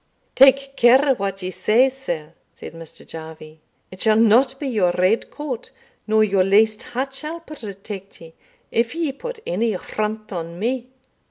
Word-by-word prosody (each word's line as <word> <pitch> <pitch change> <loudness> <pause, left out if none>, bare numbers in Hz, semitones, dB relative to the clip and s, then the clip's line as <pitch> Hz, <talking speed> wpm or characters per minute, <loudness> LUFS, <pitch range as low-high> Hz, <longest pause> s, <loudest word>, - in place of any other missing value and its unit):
"Take 275 +1 +5
care 260 +4 +5
what 195 -4 -4
you 185 - -3
say, 220 +8 +3
sir," 175 -13 -6 0.2
said - - -10
Mr. 165 -1 -10
Jarvie; 160 -1 -10 0.3
"it 185 - -11
shall 220 -1 +4
not 240 +5 +4
be 285 - -3
your 205 -8 +2
red 185 +5 +2
coat 285 -6 -6 0.4
nor 215 0 +4
your 195 -3 +3
laced 215 +3 +3
hat 265 +2 -4
shall 310 +4 -5
protect 200 - -9
you, 165 -1 -13 0.4
if 230 +3 0
you 325 -5 -1
put 485 - -7
any 220 +5 0
affront 215 +2 -4
on 170 -1 -5
me. 245 +5 -2
220 Hz, 160 wpm, -21 LUFS, 185-265 Hz, 0.4 s, Take